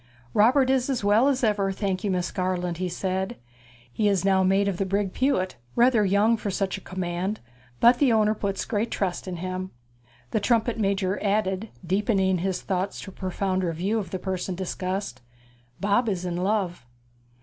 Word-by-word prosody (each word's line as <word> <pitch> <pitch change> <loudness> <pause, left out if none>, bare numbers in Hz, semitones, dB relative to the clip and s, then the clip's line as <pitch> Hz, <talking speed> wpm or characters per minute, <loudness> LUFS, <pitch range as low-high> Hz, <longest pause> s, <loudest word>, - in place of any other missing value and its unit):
'Robert 255 +5 +4
is 265 0 +1
as 255 -6 -1
well 210 +6 +4
as 270 -2 +1
ever, 205 -3 +2
thank 190 -1 -2
you, 205 - 0
Miss 180 -2 -1
Garland,' 180 -2 -1
he 185 0 -2
said. 190 +5 -2 0.6
'He 215 - +1
is 195 -2 +1
now 190 -1 +4
mate 195 +2 +3
of 195 -3 -1
the 195 - 0
brig 195 0 0
Pewit 255 - 0 0.2
rather 235 -2 +4
young 205 +4 +3
for 210 - -4
such 195 0 -1
a 195 - -8
command; 185 +2 -3 0.4
but 240 +1 +6
the 275 -4 +4
owner 215 -1 +3
puts 200 -2 -3
great 225 0 -1
trust 190 -1 -2
in 185 - -3
him.' 185 +1 -4 0.6
The - - +1
trumpet 230 +2 +1
major 195 -1 0
added, 200 0 0 0.2
deepening 190 0 +1
his 185 0 -2
thoughts 190 0 -2
to 195 - -8
a - - -21
profounder 185 -1 -1
view 195 +7 0
of 190 -5 -5
the 185 - -3
person 185 0 -3
discussed, 185 -5 -4 0.6
'Bob 205 +4 +2
is 185 -3 -2
in 175 -1 -2
love.' 185 - -1
195 Hz, 185 wpm, -25 LUFS, 185-215 Hz, 0.6 s, but